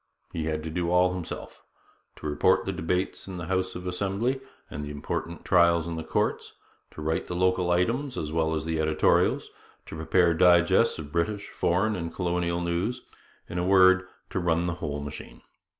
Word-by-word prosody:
He 80 - -2
had 80 -1 -2
to 80 - -5
do 85 +1 -1
all 90 +1 +3
himself: 90 -3 -7 0.5
to - - -12
report 75 -1 +2
the - - -1
debates 90 +4 -2
in 95 -2 -6
the 85 - -5
House 95 +1 -1
of 90 - -7
Assembly 100 +8 -1 0.3
and 75 - -6
important 75 +3 -5
trials 85 -2 +4
in 85 - -3
the 80 - -4
courts, - - -1 0.4
to 75 - -9
write 80 +1 -1
the 90 - -4
local 90 0 +2
items 120 +10 0
as 75 -1 -3
well 80 0 +1
as 80 - -3
the 80 -1 -1
editorials, 80 0 +2 0.3
to - - -8
prepare 85 +2 +3
digests 90 +5 +4
of 75 -3 -8
British, 100 +5 -1
foreign, 100 +5 +1
and 85 -2 -4
colonial 85 -1 -1
news; 90 +9 -2 0.4
in 90 - -4
a - - 0
word, 95 0 +5 0.2
to - - -1
'run 85 -1 +1
the 85 - -1
whole 75 -2 -3
machine.' 70 0 -9
85 Hz, 180 wpm, -27 LUFS, 80-95 Hz, 0.5 s, word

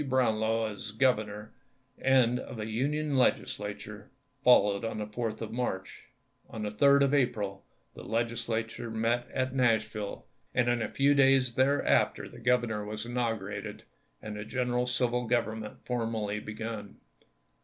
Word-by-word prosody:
Brownlow 115 -3 +2
as 105 +1 -7
governor, 110 -3 0 0.5
and 125 -2 +3
of - - -8
a 110 - -3
Union 145 +6 -1
Legislature, 105 -5 -1 0.3
followed 105 -4 +5
on 115 -1 -3
the 105 - -3
4th 110 +1 -4
of 110 -1 -5
March. 115 -6 -4 0.4
On 110 - -6
the 105 - -2
3d 140 +6 +5
of 140 0 +2
April 105 -8 0 0.3
the - - -10
Legis 115 +1 -2
lature 115 +1 -2
met 115 +2 0
at 130 0 -1
Nashville 110 -5 0 0.3
and 125 -1 +3
in 120 -1 +1
a - - -2
few 140 +1 +3
days 135 -3 +4
there 135 +4 +2
after 70 -2 +2
the - - -12
Grovernor 120 -3 +1
was 105 +1 -4
inaugurated, 110 -4 -3 0.4
and 105 -1 -5
general 125 -1 0
civil 125 -1 0
government 110 -2 -2
formally 115 -4 -2
begun. 105 -1 -6
115 Hz, 145 wpm, -30 LUFS, 105-125 Hz, 0.5 s, followed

